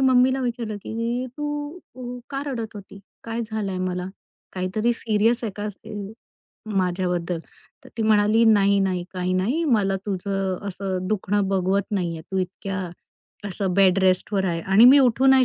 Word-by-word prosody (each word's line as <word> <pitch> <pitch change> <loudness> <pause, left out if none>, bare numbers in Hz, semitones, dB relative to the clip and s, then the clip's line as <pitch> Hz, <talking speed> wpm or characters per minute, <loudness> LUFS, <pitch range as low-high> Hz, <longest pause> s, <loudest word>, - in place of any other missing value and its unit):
मम्मीला 260 0 +4
विचारलं, 235 -4 -3
की 230 +4 -3
तू 295 +2 -4 0.2
अ, 250 -1 -6
का 275 -1 -2
रडत 230 -6 -4
होती? 200 -1 -11 0.2
काय 230 0 -3
झालाय 215 -4 -3
मला? 180 0 -2 0.5
काहीतरी 195 +6 0
सीरियस 230 +1 +1
आहे 215 - -3
का? 210 +1 -3
ते 205 +1 -10 0.7
माझ्याबद्दल? 180 -3 -1 0.5
तर - - -12
ती 225 - -1
म्हणाली, 215 +1 +4
"नाही, 200 -2 +5
नाही 185 -2 0
काही 185 0 -1
नाही. 235 - +1
मला 205 -9 +2
तुझं 195 -1 -2
असं 190 -1 -3
दुखणं 205 -1 0
बघवत 195 +1 +1
नाहीये. 175 -5 -2
तू 190 - -1
इतक्या, 185 0 -3 0.6
असं 190 -1 -2
बेडरेस्टवर 190 +1 +3
आहे." 165 -1 -1
आणि 195 +4 +5
मी 265 +3 +9
उठू 260 0 +4
नाही 265 -1 +7
205 Hz, 150 wpm, -24 LUFS, 185-235 Hz, 0.7 s, मी